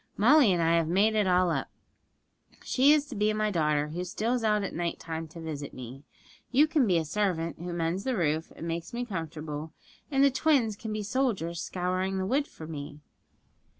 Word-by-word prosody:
Molly 255 +1 +6
and 175 -2 +2
I 165 +1 +3
have 165 -1 +1
made 200 +6 +3
it 210 -3 +2
all 180 -1 +3
up. - - -2 0.9
She 275 +3 +4
is 300 -1 +4
to 270 - -8
be 210 +1 +2
my 215 0 0
daughter, 150 -4 +1
who 175 +4 -4
steals 225 +6 -1
out 210 -2 +2
at 195 - -4
night 170 0 -2
time 160 0 -5
to 160 +2 -11
visit 150 -3 -6
me; 130 +1 -9 0.5
you 275 +4 +5
can 305 -6 +2
be 180 -3 +3
a 160 - 0
servant, 170 -2 -1
who 175 +1 -5
mends 170 +3 -1
the 255 -2 -1
roof, 160 -2 0
and 165 - -6
makes 170 +3 -4
me 245 +1 -2
comfortable; 160 -5 -5 0.4
and 275 -1 +3
the 280 - +5
twins 260 -6 +2
can 220 +1 -6
be 215 0 -3
soldiers 200 -8 -1
scouring 185 +1 -2
the 190 - -1
wood 280 +8 +1
for 160 - -11
me.' 150 -1 -7
185 Hz, 205 wpm, -28 LUFS, 165-220 Hz, 0.9 s, Molly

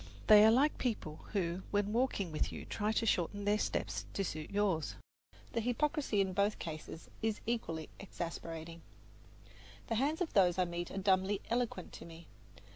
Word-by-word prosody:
They 210 -1 +9
are 220 - +8
like 270 +7 +3
people 205 -11 -2 0.2
who 180 -2 0
when 205 0 0
walking 230 -7 +1
with 155 - -1
you - - -7
try 210 0 -1
to 225 - +1
shorten 205 0 0
their 210 +1 +3
steps - - -2
to 195 - +1
suit 155 -4 -4
yours; 200 -6 0 0.6
the 230 - +1
hypocrisy 245 -1 +1
in 190 -1 0
both 200 +2 +2
cases 160 0 -7
is 220 -1 0
equally 165 -9 -2
exasperating. 165 -3 -6 1.1
The 225 - +1
hands 300 +4 +1
of 360 -3 -2
those 180 -3 +4
I 185 - +3
meet 175 0 -4
are - - -6
dumbly 190 +1 +2
eloquent 235 -7 -1
to - - -9
me. 165 0 -11
200 Hz, 170 wpm, -34 LUFS, 170-225 Hz, 1.1 s, They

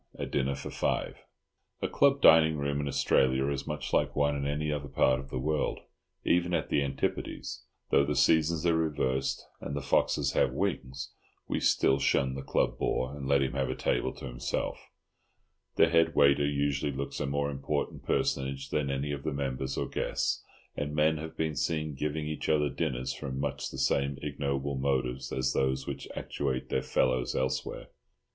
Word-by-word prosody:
A - - -3
DINNER 70 0 0
FOR 70 - -7
FIVE. - - -1 0.7
A - - +2
club 140 0 +3
dining 80 -1 +7
room 70 0 -1
in 70 - -3
Australia 65 -1 +2
is 70 -1 -3
much 75 -1 -4
like - - +2
one 70 0 +2
in 70 0 -2
any 75 +1 -1
other 70 -1 -3
part 65 -1 +3
of 65 0 -9
the - - -4
world. 75 +4 -1 0.4
Even 90 0 +2
at 80 - -1
the - - +2
Antipodes—though 70 0 -2
the 75 +1 -1
seasons 80 +1 +3
are 85 -1 +4
reversed, 70 -5 0
and 70 - -5
the - - -1
foxes 65 - +1
have - - +2
wings—we 65 +1 -4
still 65 - +3
shun 65 -1 +2
the 70 - -5
club - - 0
bore, 65 +3 -1
and 70 -2 -6
let 70 0 +4
him 65 - -1
have 65 -1 -1
a 65 - -2
table - - 0
to - - -9
himself; - - -3 0.9
the - - +6
head 80 0 +3
waiter 70 0 +5
usually 70 0 0
looks 70 +1 -4
a - - -1
more 70 +1 0
important 70 +2 -2
personage 70 0 -1
than 75 -2 0
any 70 +2 -1
of 70 -1 -3
the 75 - -2
members 65 -1 -3
or - - -1
guests; - - -1 0.3
and 75 +1 -3
men 80 +1 +3
may 80 +1 -4
be 80 -1 -2
seen 75 +2 -1
giving 75 +2 -2
each 75 0 -3
other 75 -2 +3
dinners 65 -2 -2
from 65 -1 -5
much 70 +1 -2
the - - -8
same 70 +1 +1
ignoble 70 -1 -2
motives 65 -1 -1
as 65 - 0
those 65 0 0
which 70 -1 -5
actuate 65 -3 -3
their - - +1
fellows 65 -1 +1
elsewhere. 65 0 -2
70 Hz, 180 wpm, -30 LUFS, 65-75 Hz, 0.9 s, dining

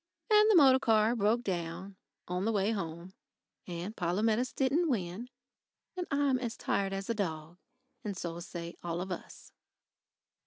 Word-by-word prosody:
And 425 0 +7
the 430 - +6
motor 265 -5 +7
car 225 -2 +3
broke 225 +2 +2
down 180 0 -4 0.3
on 180 +1 -2
the 225 - +2
way 205 0 +1
home. 170 -2 -5 0.5
And 180 +4 -5
Polumetis 215 +7 +1
didn't 295 +6 +1
win. 210 0 -2 0.7
And 360 -1 -3
I'm 280 -2 +2
as 235 -2 -4
tired 195 -1 0
as 195 0 -4
a 230 - +1
dog.... 170 -4 -4 0.4
And 205 -4 -4
so 170 -2 -4
say 170 -1 -7
all 170 0 -3
of 185 +1 -4
us. 180 - -8
200 Hz, 155 wpm, -31 LUFS, 175-245 Hz, 0.7 s, And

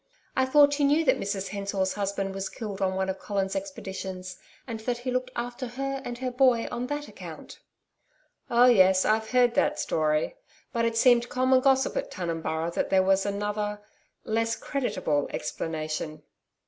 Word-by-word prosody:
I 260 - +3
thought 285 +1 +5
you 285 - +4
knew 300 +3 +3
that 260 - +3
Mrs 195 -1 -3
Hensor's 195 -1 -1
husband 200 -1 -2
was 195 0 -3
killed 205 -4 -6
on 190 -1 +1
one 190 0 0
of 190 0 -3
Colin's 195 -2 -2
expeditions, 190 -10 -6 0.3
and 230 -3 -5
that 240 +2 -2
he 250 +1 -4
looked 255 0 -1
after 245 +2 -4
her 275 +2 -4
and 240 -1 -5
her 255 0 -3
boy 250 -2 +3
on 245 +1 -3
that 290 +1 -4
account.' - - -10 0.9
'Oh, 240 +1 +5
yes, 190 -6 +5
I've 220 0 +1
heard 250 -1 +4
that - - +2
story. 155 - 0 0.4
But 230 -1 +1
it 230 0 0
seemed 240 0 +5
common 255 +1 +3
gossip 265 0 +2
at - - -2
Tunumburra 165 -2 -3
that - - -1
there 190 -1 +4
was 195 +1 +2
another 205 +1 -2 0.5
less 225 +1 0
creditable 200 - -1
explanation.' 155 -1 -4
220 Hz, 170 wpm, -27 LUFS, 190-255 Hz, 0.9 s, thought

